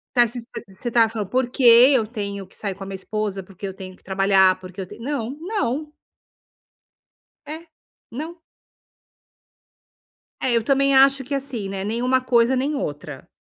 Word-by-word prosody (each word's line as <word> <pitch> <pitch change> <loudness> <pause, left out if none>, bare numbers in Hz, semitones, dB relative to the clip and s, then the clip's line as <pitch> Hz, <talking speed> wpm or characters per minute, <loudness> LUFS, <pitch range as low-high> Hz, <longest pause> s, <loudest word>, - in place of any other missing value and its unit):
tá, 240 -1 +6
se 235 +2 -4
espe 235 +1 -8
você 195 +6 -6
tá 230 -1 +4
falando 215 -3 -5
porque 255 +1 -1
eu 240 0 +7
tenho 200 -3 -5
que - - -16
sair 200 -3 -4
com 195 - -12
a - - -10
minha 195 - -7
esposa, 200 0 -3
porque 195 +1 -9
eu 190 - -6
tenho 185 -1 -10
que - - -28
trabalhar, 190 -1 +3
porque 185 +1 -10
eu 185 - -5
tenho, 230 - -12
não, 260 -3 -3
não. 305 - -2 1.5
É, 320 +3 -8 0.4
não. 320 +8 -7 2.0
É 260 - 0
eu 230 - +2
também 275 +2 +2
acho 270 0 +5
que 280 +2 -4
assim, 260 -7 -4
né, 195 0 -4
nenhuma 250 +4 +1
coisa 245 0 +3
nem 280 +4 -1
outra. 145 - -6
230 Hz, 170 wpm, -22 LUFS, 195-265 Hz, 2.0 s, eu